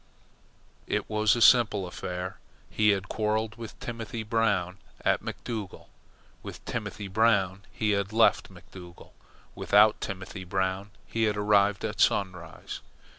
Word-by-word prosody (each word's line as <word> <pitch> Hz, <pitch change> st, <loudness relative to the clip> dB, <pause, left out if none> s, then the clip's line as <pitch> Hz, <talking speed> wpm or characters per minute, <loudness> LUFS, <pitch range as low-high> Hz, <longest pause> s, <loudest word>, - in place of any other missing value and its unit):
It -, -, -1 dB
was 110 Hz, 0 st, +2 dB
a 120 Hz, -, +3 dB
simple 105 Hz, -6 st, +5 dB
affair. 90 Hz, +1 st, -6 dB, 0.3 s
He 105 Hz, -1 st, +3 dB
had 100 Hz, -1 st, +1 dB
quarrelled 110 Hz, 0 st, -1 dB
with 115 Hz, -2 st, -9 dB
Timothy 115 Hz, -1 st, -5 dB
Brown 105 Hz, -5 st, 0 dB, 0.3 s
at -, -, +2 dB
McDougall. 110 Hz, -5 st, -6 dB, 0.5 s
With -, -, -10 dB
Timothy 105 Hz, -1 st, -5 dB
Brown 100 Hz, -2 st, +2 dB
he 110 Hz, -2 st, 0 dB
had 100 Hz, 0 st, 0 dB
left 115 Hz, +1 st, +3 dB
McDougall. 90 Hz, -2 st, -13 dB, 0.4 s
Without 105 Hz, +1 st, +4 dB
Timothy 95 Hz, -1 st, -6 dB
Brown 95 Hz, +2 st, -2 dB, 0.2 s
he 115 Hz, 0 st, 0 dB
had 105 Hz, -1 st, 0 dB
arrived 105 Hz, 0 st, +2 dB
at 105 Hz, -1 st, -3 dB
Sunrise. 90 Hz, -5 st, -1 dB
105 Hz, 125 wpm, -28 LUFS, 95-110 Hz, 0.5 s, simple